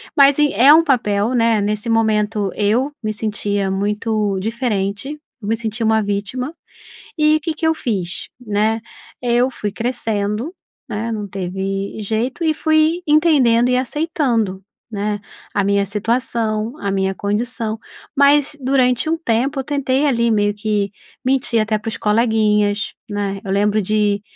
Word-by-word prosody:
Mas 280 -1 +6
e 295 -1 +3
é 275 +5 +7
um 325 - +6
papel, 225 -7 +1
né? 230 -3 +3
Nesse 210 +2 -2
momento 215 -2 +1
eu 235 +8 +1
me 215 -2 -2
sentia 205 -2 -1
muito 210 +1 -1
diferente, 225 +3 -2 0.2
eu 205 - -6
me 225 - +2
sentia 225 0 -3
uma 220 0 +3
vítima. 205 +7 -3 0.7
E 305 0 +4
o - - -6
que 325 0 -2
que 320 +1 -1
eu 320 - +2
fiz, 195 - -3
né? 220 -1 0 0.4
Eu 245 +1 +2
fui 210 -4 -4
crescendo, 220 - -2 0.4
né. 225 +2 -3
Não 210 -2 -4
teve 195 +2 -4
jeito 230 - -2
e 315 - +2
fui 315 +2 +2
entendendo 280 -7 +4
e 250 - +3
aceitando, 255 - -1 0.3
né. 205 0 -2 0.3
A 200 - +1
minha 200 0 +2
situação, 225 +1 -1
a 200 -1 -2
minha 190 0 0
condição. 220 +2 -2 0.4
Mas 285 +1 +4
durante 255 +1 +2
um 325 - +1
tempo 270 0 0
eu - - -2
tentei 280 0 0
ali, 235 -3 +2
meio 205 -1 +2
que 205 -1 -1 0.3
mentir 255 -3 +1
até 215 0 0
para 225 - -4
os 220 - -3
coleguinhas, 210 -2 +1 0.2
né. 200 -1 -2
Eu 195 - -4
lembro 210 +2 +2
de 205 0 +1
220 Hz, 155 wpm, -19 LUFS, 205-255 Hz, 0.7 s, é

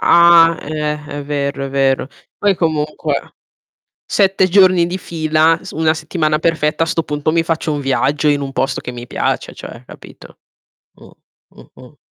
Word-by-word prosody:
Ah, 170 -1 +6
eh, 150 0 -4
è 145 -1 -6
vero, 140 -1 -3
è - - -4
vero. 135 0 +1 0.3
Poi 205 -1 +2
comunque 155 -3 -2 0.7
7 190 -2 +2
giorni 185 -2 +4
di 180 +2 -4
fila, 160 -1 +1
su 185 - -9
una 160 0 +2
settimana 155 -1 -1
perfetta 160 -1 0
a - - -9
'sto 165 - -1
punto 150 0 -2
mi 165 - +2
faccio 165 -1 -2
un 145 - -2
viaggio 140 +2 0
in 145 -1 +2
un 135 -1 -5
posto 135 - -1
che 125 - -7
mi 120 0 -9
piace - - -2
cioè, - - -11
capito. - - -14 0.6
Mh. - - -17 0.4
Mh-mh 130 +3 -17
155 Hz, 165 wpm, -17 LUFS, 145-165 Hz, 0.7 s, Ah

